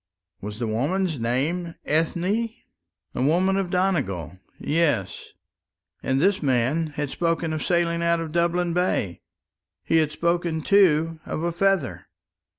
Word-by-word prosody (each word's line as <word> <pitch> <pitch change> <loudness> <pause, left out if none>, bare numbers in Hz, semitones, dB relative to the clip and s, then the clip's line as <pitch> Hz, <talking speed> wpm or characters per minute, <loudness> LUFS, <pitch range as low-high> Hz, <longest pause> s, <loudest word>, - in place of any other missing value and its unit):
Was 105 +1 -6
the 120 - -2
woman's 150 - -1
name 155 +9 -1
Ethne? 165 +3 0 0.9
A - - -3
woman 180 +8 +2
of 195 -2 -1
Donegal 100 - -1 0.2
yes; 145 - 0 0.7
and 130 0 0
this 195 +5 +2
man 135 +4 +1
had 145 -2 -4
spoken 165 -2 -1
of 155 - -3
sailing 170 -1 +1
out 170 0 +2
of 165 -2 -5
Dublin 170 +1 +1
Bay 170 - 0 0.6
he 165 - +2
had 155 -2 +2
spoken, 170 0 0
too, 165 -5 +3
of 155 - -3
a 170 - 0
feather. 185 -5 0
165 Hz, 135 wpm, -24 LUFS, 140-175 Hz, 0.9 s, too